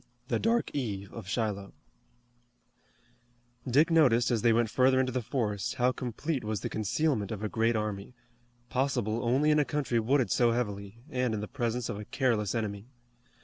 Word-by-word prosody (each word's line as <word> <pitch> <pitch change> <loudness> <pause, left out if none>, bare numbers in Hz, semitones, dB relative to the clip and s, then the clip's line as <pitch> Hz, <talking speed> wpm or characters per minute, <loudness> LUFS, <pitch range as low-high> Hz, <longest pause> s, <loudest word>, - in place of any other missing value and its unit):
THE - - +1
DARK 230 +2 +1
EVE 100 -8 -4
OF 110 -5 -8
SHILOH 100 -2 -2 2.0
Dick 150 +7 +4
noticed 125 -8 +4
as 115 -3 +1
they 115 - +4
went 115 -1 +2
further 130 0 +4
into 130 -1 +1
the 125 0 -1
forest 105 -4 -2
how 125 -1 +3
complete 130 +4 -3
was 105 -1 -3
the - - -3
concealment 110 0 0
of 110 -1 -5
a - - 0
great 115 +2 +1
army, 105 +2 -3 0.5
possible 125 -4 -1
only 135 +6 +3
in 150 - +4
a - - +4
country 140 -5 -1
wooded 130 +3 +1
so 120 -2 +3
heavily, 100 -3 -3
and 125 -4 0
in - - -3
the 105 - -4
presence 120 -2 -2
of 105 -3 -4
a 105 - -7
careless 120 -3 0
enemy. 105 -1 -3
115 Hz, 175 wpm, -29 LUFS, 105-130 Hz, 2.0 s, Dick